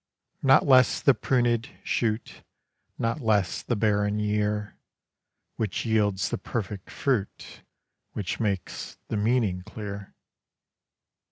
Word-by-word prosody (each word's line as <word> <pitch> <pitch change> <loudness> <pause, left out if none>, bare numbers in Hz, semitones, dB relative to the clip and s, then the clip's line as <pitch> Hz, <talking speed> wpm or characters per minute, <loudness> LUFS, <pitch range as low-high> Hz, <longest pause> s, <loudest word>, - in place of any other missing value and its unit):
Not 135 -1 +5
less 130 -3 +5
the 140 - +5
prunèd 120 -3 +1 0.2
shoot, 110 -1 -1 0.6
Not 115 +6 -1
less 105 -5 +1
the 120 - -1
barren 105 -1 +1
year, 105 0 -1 0.8
Which 105 -1 -2
yields 105 -3 +1
the - - -3
perfect 105 -4 -4
fruit, 120 -8 -2 0.5
Which 100 -4 -3
makes 100 -5 -3
the - - -1
meaning 105 -4 +1
clear. 100 0 -8
105 Hz, 105 wpm, -27 LUFS, 105-120 Hz, 0.8 s, Not